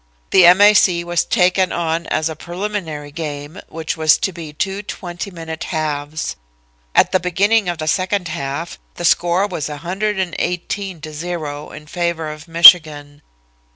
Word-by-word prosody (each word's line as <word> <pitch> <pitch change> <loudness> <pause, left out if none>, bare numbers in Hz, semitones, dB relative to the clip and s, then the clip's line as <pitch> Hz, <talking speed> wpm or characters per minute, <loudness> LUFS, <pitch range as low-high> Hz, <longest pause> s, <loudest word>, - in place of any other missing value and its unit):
The 180 -2 +7
M. 180 +3 +6
A. 205 +1 +8
C. 175 -4 +3
was 175 -1 0
taken 185 -2 +2
on 165 -1 -2
as 155 0 0
a 160 - -5
preliminary 170 -4 -5
game, 150 +2 -7
which 160 0 -4
was 155 -1 +4
to 190 - -2
be 165 -3 -8
two 195 +6 -3
twenty 180 -1 -7
minute 165 -3 -7
halves. 155 -2 -3 0.6
"At - - +4
the 185 - +2
beginning 195 +3 +1
of 175 - -3
the 155 -1 -5
second 185 +2 0
half 155 +1 -5 0.2
the 175 - -4
score 175 +3 +2
was 170 -7 -4
118 185 +1 -3
to 155 0 -8
0, 150 -2 -5
in 150 0 -11
favor 165 -1 -3
of 155 +2 -11
Michigan. 155 -4 +6
170 Hz, 155 wpm, -18 LUFS, 155-185 Hz, 0.6 s, A